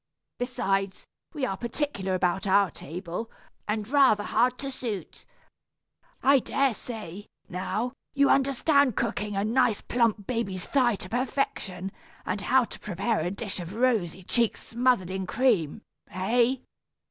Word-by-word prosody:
Besides, 195 -6 -1 0.3
we 295 -5 -2
are 195 - -2
particular 230 -4 -2
about 185 +2 0
our 195 -1 +4
table, 180 +9 -6 0.4
and 210 0 -1
rather 260 -6 +4
hard 245 +4 +2
to 275 0 -5
suit. 220 -9 -6 1.0
I 275 +1 +6
dare 270 +1 +1
say, 210 -4 -7 0.2
now, 215 +7 -2 0.2
you 280 0 +5
understand 275 -1 +3
cooking 210 0 -1
a 195 - +1
nice 230 0 +2
plump 230 -4 +1
baby's 195 -6 -2
thigh 250 -5 +3
to 185 - -8
perfection, 215 -7 -2 0.3
and 190 +2 -2
how 260 +5 +4
to - - -10
prepare 205 +4 -1
a 165 +3 -1
dish 200 +1 -4
of 175 +3 -6
rosy 220 -8 +1
cheeks 235 +4 +1
smothered 235 -6 +2
in 190 -1 -3
cream, 220 - +1 0.3
hey? 240 +7 +1
220 Hz, 135 wpm, -27 LUFS, 190-255 Hz, 1.0 s, I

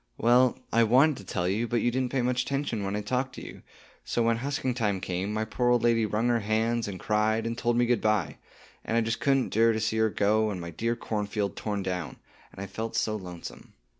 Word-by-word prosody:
"Well, 125 +2 +4 0.2
I 115 - +5
wanted 130 +6 +4
to 100 - -10
tell 90 -1 -1
you, 105 +6 0
but 115 -1 0
you 120 - +2
didn't 130 0 -1
pay 130 -3 0
much 125 0 +1
'tention 135 -6 -2
when 100 +1 -2
I 105 - -1
talked 130 +5 -2
to - - -8
you; - - -10 0.4
so, 120 - 0
when 115 0 +2
husking 130 0 -2
time 105 -5 0
came, 90 +2 -3
my 110 +1 -1
poor 120 +2 0
old 120 -1 +3
lady 115 -2 +3
wrung 110 +3 0
her 120 -1 +2
hands 110 +2 0
and 95 -3 -6
cried, 110 +1 +1
and 115 0 -2
told 120 0 0
me 120 - +4
good 120 -1 +1
bye, 105 -6 0 0.5
and 115 - -1
I - - +4
just 115 +1 -1
couldn't 135 -2 +1
'dure 115 +1 +4
to 110 - -1
see 110 0 -1
her 110 0 +3
go, 110 +1 +2
and 100 -3 -4
my 85 0 -6
dear 115 +8 -1
cornfield 105 -3 -3
torn 100 -2 -3
down, 90 -2 -3 0.4
and - - -20
I - - -6
have 100 0 -7
felt 110 +2 -4
so 110 - 0
lonesome. 90 -4 -9
110 Hz, 245 wpm, -28 LUFS, 105-120 Hz, 0.5 s, I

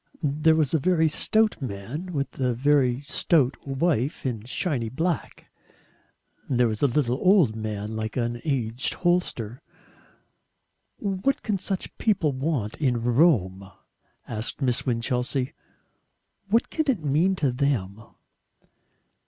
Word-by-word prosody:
There 150 +2 +3
was 155 -3 +1
a 160 - +3
very 160 +1 +3
stout 215 +6 +2
man 125 - -5
with 140 -4 -3
a 125 -2 +1
very 130 -1 +2
stout 145 -2 +1
wife 140 -1 0
in 115 -4 -3
shiny 130 - -2
black; 165 +7 -3 1.0
there 125 -2 +3
was 110 -1 -3
a 145 - +5
little 125 -1 +1
old 180 - +4
man 110 -1 -4
like 110 +1 -4
an 120 -1 -2
aged 125 -4 -1
hostler. 160 - -1 1.4
"What 200 +7 -1
CAN 205 -4 -1
such 190 0 -4
people 190 -9 +2
want 130 -5 -2
in 125 -6 +1
Rome?" 110 - +2 0.6
asked 110 0 -2
Miss 130 -3 0
Winchelsea. 125 +2 -1 1.0
"What 230 +3 +2
can 315 -3 -1
it 215 - +1
mean 165 +7 +2
to 145 -7 +1
them?" 120 -7 -1
135 Hz, 125 wpm, -25 LUFS, 120-160 Hz, 1.4 s, a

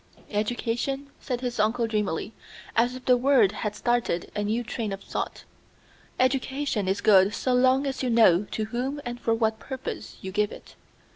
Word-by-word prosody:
"Education," 240 +6 -2
said 250 -2 -3
his 245 -3 -3
uncle 225 +3 +2
dreamily, 210 -3 -2 0.4
as 240 +2 +2
if 255 - -10
the 250 - +6
word 245 -5 +4
had 210 0 -4
started 240 -7 0
a 210 - -1
new 220 +4 0
train 230 -2 -4
of 195 0 -6
thought, - - -4 0.8
"education 265 -4 0
is 195 +2 0
good 200 0 +5
so 255 - 0
long 260 +2 +4
as 270 -1 -2
you 255 - 0
know 210 -5 +5
to 215 - -2
whom 250 +6 -3
and 240 0 -5
for 230 -1 +1
what 220 -1 0
purpose 260 +2 -6
you 190 - -6
give 210 +1 +1
it. - - -12
235 Hz, 175 wpm, -26 LUFS, 210-255 Hz, 0.8 s, the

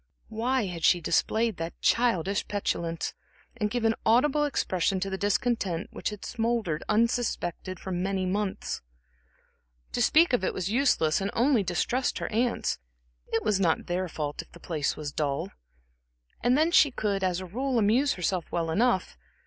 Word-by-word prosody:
Why 235 +2 0
had 175 -3 -6
she 175 - +5
displayed 220 +6 +1
that 165 +1 -5
childish 200 -5 +1
petulance, 170 -5 -2 0.4
and 210 -3 -1
given 225 -1 +1
audible 280 +6 +3
expression 190 - 0
to 195 +1 -3
the - - -1
discontent 205 -4 0
which - - -3
had 210 -1 -8
smouldered 225 -9 -1
unsuspected 215 -5 0
for 190 - -6
many 185 +1 -1
months? 195 +1 -2 1.1
To - - -1
speak 325 -2 +5
of 220 - +2
it - - -1
was 185 +1 -2
useless 220 - +2
and 195 - -1
only 245 -1 +3
distressed 200 +8 0
her - - -4
aunts; 235 +2 0 0.5
it 225 - -1
was 210 -3 +1
not 170 -4 +1
their 180 +1 -1
fault 150 -3 -4
if - - -18
the 170 - -13
place 155 -4 -2
was 150 -1 -5
dull. 150 +5 -2 0.9
And 250 +2 +3
then 320 +3 +3
she 305 -4 +6
could, 205 -6 -2
as 180 -1 +1
a 185 - -6
rule, 250 +7 -2
amuse 235 +7 +3
herself 180 -1 -2
well 165 -1 -1
enough. 195 - +1
200 Hz, 165 wpm, -28 LUFS, 175-235 Hz, 1.1 s, she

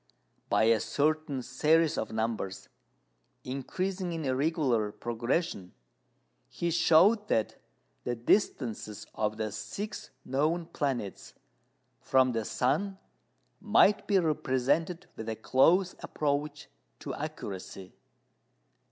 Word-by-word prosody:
By - - +3
a 115 0 +4
certain 145 +3 0
series 155 +6 +2
of - - -3
numbers, 110 -4 -3 0.7
increasing 180 +8 -3
in 145 -6 -1
regular 130 -7 +1
progression, 120 - -2 0.7
he 170 0 -2
showed 175 +6 +5
that 110 - 0 0.4
the 120 - -2
distances 115 - 0
of 105 0 -1
the 110 -1 -2
six 205 - -6 0.2
known 155 +6 0
planets 135 - -3 0.6
from 130 -1 +3
the 115 -2 -2
sun 140 - 0 0.6
might 210 -1 +4
be 200 - +4
represented 160 +2 0
with 110 0 -6
a 110 - -2
close 170 - +3
approach 145 +1 -2 0.3
to - - -5
accuracy. 95 -1 -7
140 Hz, 100 wpm, -30 LUFS, 115-165 Hz, 0.7 s, showed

